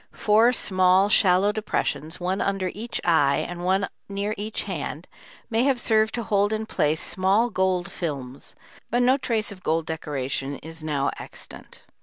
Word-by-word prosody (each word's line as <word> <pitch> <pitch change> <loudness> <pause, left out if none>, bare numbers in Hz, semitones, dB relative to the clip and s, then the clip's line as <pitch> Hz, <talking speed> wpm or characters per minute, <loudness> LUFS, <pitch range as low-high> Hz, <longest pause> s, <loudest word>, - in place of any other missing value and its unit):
Four 220 +3 +4
small, 185 -3 +3
shallow 195 0 +4
depressions, 210 -6 -2
one 185 +2 -1
under 195 -2 -1
each 230 +3 -4
eye 145 -5 +3
and 175 0 -7
one 190 +2 +1 0.2
near 200 +1 -2
each 210 +2 -4
hand, 170 -3 -5 0.4
may 225 0 +1
have 270 -3 +2
served 220 -1 +2
to 235 - -3
hold 205 -1 +1
in 220 0 -2
place 155 -6 0
small 200 +6 +1
gold 185 -2 0
films, 140 -6 -6 0.3
but 245 +2 +2
no 255 +2 +4
trace 225 -6 -1
of 190 -2 -11
gold 160 -1 0
decoration 140 -3 -3
is 160 0 -9
now 145 -3 0
extant. - - -11
190 Hz, 160 wpm, -24 LUFS, 160-215 Hz, 0.4 s, Four